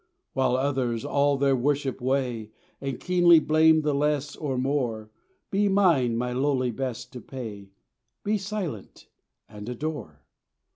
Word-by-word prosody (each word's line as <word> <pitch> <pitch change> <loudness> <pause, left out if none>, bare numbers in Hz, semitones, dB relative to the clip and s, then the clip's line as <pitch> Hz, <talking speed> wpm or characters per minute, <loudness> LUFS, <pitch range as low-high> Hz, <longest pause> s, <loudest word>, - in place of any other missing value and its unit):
While 130 -1 +2
others 130 -4 -1
all 140 0 +2
their 135 0 +3
worship 135 0 -1
weigh, 125 -4 -1 0.3
And 135 -3 -4
keenly 175 -2 +5
blame 155 +1 +4
the 150 -1 +1
less 145 0 0
or 135 -4 -3
more, 125 -5 -1 0.4
Be 205 +1 +2
mine 165 -12 +3
my 125 +1 -2
lowly 130 -1 +1
best 125 0 -5
to 125 - -7
pay, 105 -7 -8 0.5
"Be 210 +1 0
silent, 190 - -6 0.4
and 105 +1 -9
adore." 125 - -5
135 Hz, 135 wpm, -26 LUFS, 125-150 Hz, 0.5 s, keenly